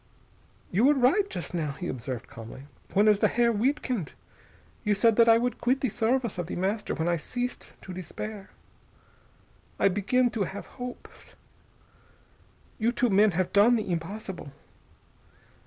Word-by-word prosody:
"You 205 +7 +3
were 295 +2 +5
right, 285 +11 +3
just 175 -1 -5
now," 155 -5 -2
he 175 +5 -6
observed 125 -3 -5
calmly, 115 +4 -10 0.3
"when 205 +2 +4
as 210 -2 +5
the - - +4
Herr 235 0 +2
Wiedkind 245 - -1 0.7
you 210 0 +2
said 225 +2 +4
that 230 0 +5
I 225 - +7
would 245 +1 -2
quit 255 +3 +1
the 260 - +1
service 225 -1 0
of 175 - -3
The - - -4
Master 195 +4 -1
when 160 - -1
I 175 0 +2
ceased 245 +10 -5
to 185 - -8
despair. 195 +3 -7 1.3
I 200 - +4
begin 230 +6 +1
to 215 -3 -1
have 195 +3 -7
hopes. 245 0 -10 1.4
You 230 +2 +2
two 240 -1 +1
men 205 +2 +5
have 185 +1 -1
done 210 +4 +6
the 215 -5 -2
impossible. 175 -2 -5
210 Hz, 155 wpm, -27 LUFS, 180-240 Hz, 1.4 s, I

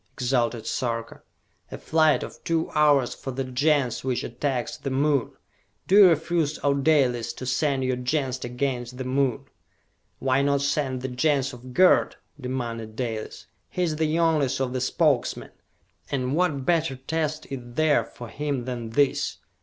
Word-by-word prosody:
exulted 120 -3 0
Sarka. 115 -2 -3 0.5
"A - - -5
flight 155 -1 +2
of - - -10
two 165 -1 -1
hours 145 -4 +3
for - - -8
the 135 +1 -2
Gens 130 0 +1
which 130 -2 -1
attacks 125 +1 -2
the 135 - -5
Moon! 140 0 +1 0.5
Do 190 - +3
you 200 -3 +9
refuse, 160 -1 0
O 140 - +3
Dalis, 135 -5 +2
to 130 - -7
send 135 +1 0
your 130 -1 0
Gens 130 0 -1
against 125 0 -3
the 130 - -4
Moon?" 130 -1 0 0.7
"Why 130 0 +1
not 140 0 +2
send 140 -3 -1
the - - -1
Gens 135 +1 0
of 125 +1 -11
Gerd!" 185 -1 +5 0.2
demanded 120 -4 -4
Dalis. 115 -3 -4 0.2
"He 180 - -2
is 160 -3 -1
the 160 0 +1
youngest 155 -5 +1
of 130 -2 -1
the 130 - -2
Spokesmen, 140 0 +1 0.6
and 130 0 -1
what 155 -6 0
better 165 -4 +1
test 155 +3 -3
is 135 - -3
there 145 +5 +1
for 120 - -10
him 140 -3 -3
than 120 -3 -4
this?" 140 +4 +1
135 Hz, 160 wpm, -25 LUFS, 125-150 Hz, 0.7 s, you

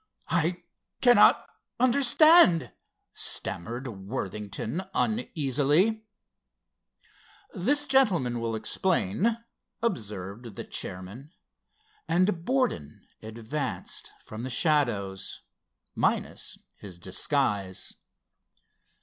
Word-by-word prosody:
"I 175 +1 +1 0.4
cannot 245 -1 +6 0.3
understand," 255 - +5 0.4
stammered 120 +9 -2
Worthington, 105 - -5
uneasily. 185 - +1 1.5
"This 280 +10 +2
gentleman 185 - +2
will 115 -1 -2
explain," 185 - +1 0.5
observed 105 - -4
the - - -6
chairman 100 - -6 0.7
and 180 0 +1
Borden 245 - -1 0.2
advanced 115 +6 -5
from 110 +1 -8
the 130 - -4
shadows, 120 - 0 0.5
minus - - -1 0.2
his 95 -4 -10
disguise. 100 - -1
140 Hz, 70 wpm, -27 LUFS, -, 1.5 s, cannot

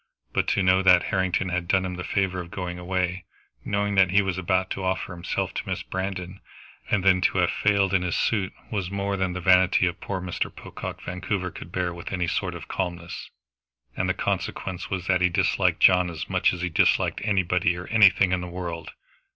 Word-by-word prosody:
But - - +1
to 100 - +1
know 90 0 +4
that 90 -2 +6
Harrington 95 0 +1
had 90 -1 -2
done 95 0 +2
him 90 - -4
the 90 0 -5
favor 95 -2 -1
of 85 -1 -7
going 90 -1 -5
away, 90 0 -2 0.4
knowing 100 0 -1
that 95 -2 +5
he 100 +3 +4
was 95 -2 -1
about 95 +1 0
to 95 - -3
offer 95 0 -2
himself 85 0 -3
to - - -5
Miss - - -2
Brandon, 95 0 -5 0.5
and 100 -3 +1
then 95 -1 +4
to - - +1
have - - +3
failed 100 -2 +2
in 95 - +3
his 90 -2 -1
suit 100 -5 0 0.2
was 100 -5 -2
more 100 0 -2
than 95 -2 -1
the 90 - -4
vanity 95 0 +4
of 85 +1 -2
Mr. 90 -3 -3
Pocock - - -8
Vancouver 90 0 -3
could 85 - -10
bear 90 -1 -1
with 85 -1 -8
any 90 -2 -1
sort - - -2
of - - -9
calmness, 85 -2 -4 0.7
and - - -1
the - - +1
consequence 95 +1 -3
was 95 -2 -3
that 90 0 +2
he 90 - +4
disliked 90 -1 +1
John 90 -1 +5
as 80 -2 -6
much - - +2
as 90 -1 -5
he 90 - 0
disliked 80 - +2
anybody 90 -4 +1
or 90 - -6
anything 100 -4 +5
in 95 -1 +1
the 90 - -5
world. 85 -3 -6
90 Hz, 210 wpm, -25 LUFS, 90-95 Hz, 0.7 s, that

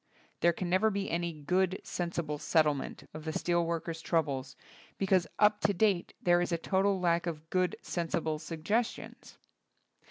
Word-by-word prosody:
There 170 - +5
can 175 +2 -4
never 190 +5 +3
be 200 -1 -2
any 170 0 -1
"good, 180 +5 0
sensible 170 -4 -3
settlement" 150 -4 +1
of 155 0 -7
the 160 - -3
steel 170 +2 +1
workers' 165 0 -3
trou 165 -1 +2
bles, 135 -2 -5 0.4
because 190 -3 +2
up 210 0 +4
to 205 - +2
date 195 -2 +2
there 175 0 +3
is 175 - -1
a 170 - +2
total 190 +3 +1
lack 170 -1 +1
of 160 -1 -5
"good, 185 -1 +1
sensible" 165 -3 -2
suggestions. 170 +9 -3
170 Hz, 160 wpm, -31 LUFS, 160-185 Hz, 0.4 s, There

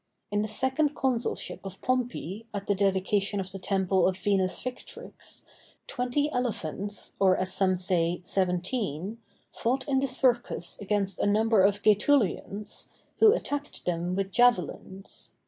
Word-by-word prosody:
In 205 0 +1
the 215 - -2
second 265 +7 0
consulship 250 -3 -1
of 195 -1 -8
Pompey 235 -5 -3
at 200 -1 -4
the 205 - +1
dedication 195 +1 0
of 190 -1 -4
the 195 - -7
temple 190 -1 +1
of 190 0 -1
Venus 190 -1 +1
Victrix, 255 0 -5 0.4
twenty 250 +3 -1
elephants, 205 -4 +1
or, 190 -2 +4
as 185 0 +1
some 185 -1 +2
say, 175 -1 0
seventeen, 185 - -2 0.3
fought 260 +4 -2
in 270 -2 +2
the 275 - 0
Circus 245 -8 +2
against 200 -2 0
a - - +1
number 215 0 +3
of 200 +1 +2
Gætulians, 210 - +2 0.3
who 440 -1 +7
attacked 290 - -3
them 175 +1 -2
with 195 0 -2
javelins. 195 -4 0
205 Hz, 140 wpm, -27 LUFS, 190-245 Hz, 0.4 s, who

